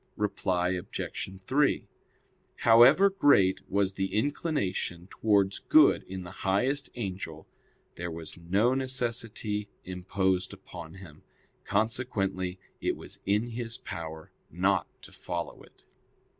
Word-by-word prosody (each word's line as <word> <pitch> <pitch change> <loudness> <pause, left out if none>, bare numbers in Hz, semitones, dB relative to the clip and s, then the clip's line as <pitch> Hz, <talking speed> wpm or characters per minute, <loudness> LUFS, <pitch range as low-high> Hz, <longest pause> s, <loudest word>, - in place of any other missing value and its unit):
Reply 90 -3 0
Obj. 90 0 -4
3: 135 +8 +1 0.7
However 130 +12 +7
great 120 - +4
was 100 -1 +1
the 95 +1 -2
inclination 110 - -1
towards 100 -3 +2
good - - +5
in 95 0 -6
the 85 - -9
highest 125 +9 +1
angel, 95 -8 -5 0.5
there 85 0 -3
was 80 -1 -6
no 95 +8 +2
necessity 115 -5 -2
imposed 95 +1 -1
upon 85 -4 -10
him: 85 -6 -13 0.4
consequently 100 -4 -1 0.2
it - - 0
was - - -9
in 105 +4 +2
his 115 -1 -3
power 80 -1 -7 0.2
not - - +1 0.2
to - - -11
follow 85 -1 -5
it. - - -20
100 Hz, 115 wpm, -29 LUFS, 90-115 Hz, 0.7 s, However